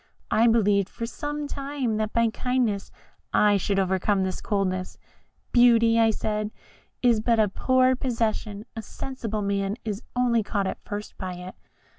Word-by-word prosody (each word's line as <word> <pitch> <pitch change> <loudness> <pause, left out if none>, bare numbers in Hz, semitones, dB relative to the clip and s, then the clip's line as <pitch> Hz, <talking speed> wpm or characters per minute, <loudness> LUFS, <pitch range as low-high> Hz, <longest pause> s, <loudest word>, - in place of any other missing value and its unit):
I 230 +2 +4
believed 205 -4 +3
for 230 - -5
some 295 +4 -4
time 275 -5 -2
that 215 0 -1
by 230 -1 +2
kindness 250 -6 0 0.4
I 205 -1 +4
should 200 0 -1
overcome 190 +1 +1
this 185 -1 -3
coldness. 185 -3 -2 0.5
'Beauty,' 230 -2 +5
I 225 0 +5
said, 215 -1 -2 0.5
'is 235 -3 +4
but 230 +1 +2
a 215 - +4
poor 255 +5 +3
possession 225 -4 -2
a 225 - -4
sensible 220 -2 -5
man 200 +1 -1
is 210 0 -3
only 245 -2 +3
caught 205 -1 -1
at 190 - -4
first 205 0 -6
by 185 -2 -4
it. 180 +1 -8
215 Hz, 155 wpm, -25 LUFS, 200-240 Hz, 0.5 s, Beauty